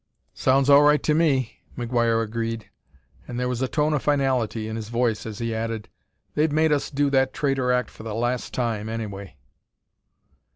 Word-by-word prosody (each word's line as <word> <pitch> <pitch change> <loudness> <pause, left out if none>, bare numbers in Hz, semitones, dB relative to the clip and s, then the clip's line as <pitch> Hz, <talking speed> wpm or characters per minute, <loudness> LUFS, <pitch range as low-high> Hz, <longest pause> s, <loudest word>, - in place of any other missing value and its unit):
"Sounds 135 +1 +2
all 140 0 +8
right 150 0 +4
to 155 - +2
me," 140 -7 +1 0.2
McGuire 115 -1 +1
agreed, 115 -1 -4 0.6
and 120 - -5
there 125 - 0
was 125 0 -2
a 130 - +1
tone 150 +2 +1
of 145 - 0
finality 130 -6 0
in 110 - -4
his 110 -1 -6
voice 115 -2 0
as 105 -2 -6
he 115 0 -2
added: 110 -1 -3 0.4
"They've 150 +1 +2
made 155 +1 +3
us 145 -2 +1
do 145 0 +1
that 130 -1 +2
traitor 135 -3 +1
act 125 0 0
for - - -13
the 110 -1 -5
last 120 +2 -1
time, 110 -3 -2
anyway." 100 -5 -6
125 Hz, 180 wpm, -24 LUFS, 115-140 Hz, 0.6 s, all